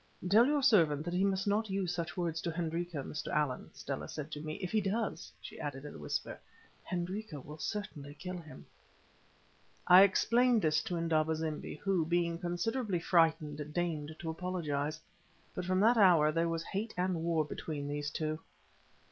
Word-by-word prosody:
"Tell 220 +6 +6
your 290 -1 +2
servant 165 - +4
that 175 - -3
he 180 +2 +2
must 195 -1 +1
not 210 +1 +1
use 190 -2 -1
such 170 -1 -4
words 165 -2 -1
to 170 - -2
Hendrika, 165 -2 -3
Mr. 150 - -5
Allan," 150 -4 -1
Stella - - -5
said 150 +1 -6
to 150 - -5
me. 155 0 -4
"If 185 -2 -5
he 215 - +2
does," 200 -2 -2
she - - -10
added, 145 -2 -5
in 145 - -7
a - - -10
whisper, 75 - -3 0.4
"Hendrika 180 -1 -4
will 150 +3 -10
certainly 150 -7 -5
kill 180 +2 -6
him." 155 -2 -12 1.2
I 180 +1 +9
explained 230 +4 +4
this 155 -1 +3
to 175 - -2
Indaba 160 -1 +1
zimbi, 155 -1 -4
who, 195 -4 +1
being 170 0 0
considerably 190 +4 -1
frightened, 155 -3 +1
deigned 160 -3 -2
to 165 - -5
apologize. 160 -4 -2 0.5
But 180 - -4
from 185 +1 +1
that 230 +3 +5
hour 170 -7 +6
there 165 +1 +1
was 165 0 -2
hate 215 +6 -4
and 180 -2 0
war 165 -2 +1
between 145 -1 -5
these 145 0 -2
two. 155 +1 -2
170 Hz, 175 wpm, -33 LUFS, 155-190 Hz, 1.2 s, I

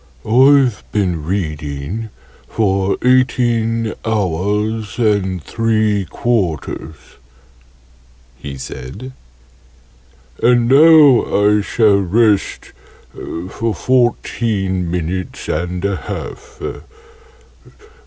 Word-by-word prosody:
"I've 130 0 +4
been 90 -7 -1
reading 80 +3 -4 0.4
for 95 -3 0
eighteen 120 -3 +1
hours 105 +2 -2
and 100 -6 0
three 110 -2 0
quarters," 90 - -2 1.4
he 70 +2 -8
said, 65 - -8 1.3
"and 120 -1 +3
now 145 -1 +6
I 105 +1 +3
shall 105 -1 +2
rest 105 +2 +1 0.4
for 95 +6 -5
fourteen 110 -6 0
minutes 90 +1 -4
and 90 +4 -3
a 100 -1 -1
half. - - -8
105 Hz, 75 wpm, -17 LUFS, 90-115 Hz, 1.4 s, now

